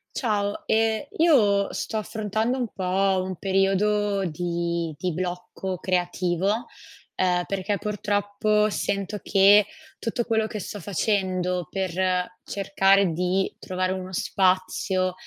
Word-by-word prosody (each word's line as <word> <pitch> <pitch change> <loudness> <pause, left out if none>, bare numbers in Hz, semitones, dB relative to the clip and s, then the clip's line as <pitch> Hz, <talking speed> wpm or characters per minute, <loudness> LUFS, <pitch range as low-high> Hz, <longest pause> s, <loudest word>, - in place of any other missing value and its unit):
Ciao, 205 -4 -1
ehm, 225 +3 +1
io 215 -12 +4
sto 220 - -3
affrontando 220 +3 -1
un 245 - -1
po' 190 0 +1
un 185 0 -4
periodo 195 +1 +1
di 170 0 -2
di 180 +2 -2
blocco 180 +2 -4
creativo, 180 +4 0 0.5
uhm, 180 -1 +2
perché 195 +1 -2
purtroppo 210 +1 0
sento 200 +1 -2
che 200 +1 +5 0.3
tutto 235 +1 -2
quello 220 -2 +1
che 215 - -5
sto 205 - -6
facendo 185 -2 -1
per 185 -1 -1
cercare 195 -1 +2
di 180 +3 0
trovare 185 0 -2
uno 185 0 -4
spazio, 185 0 +1
195 Hz, 115 wpm, -25 LUFS, 185-210 Hz, 0.5 s, che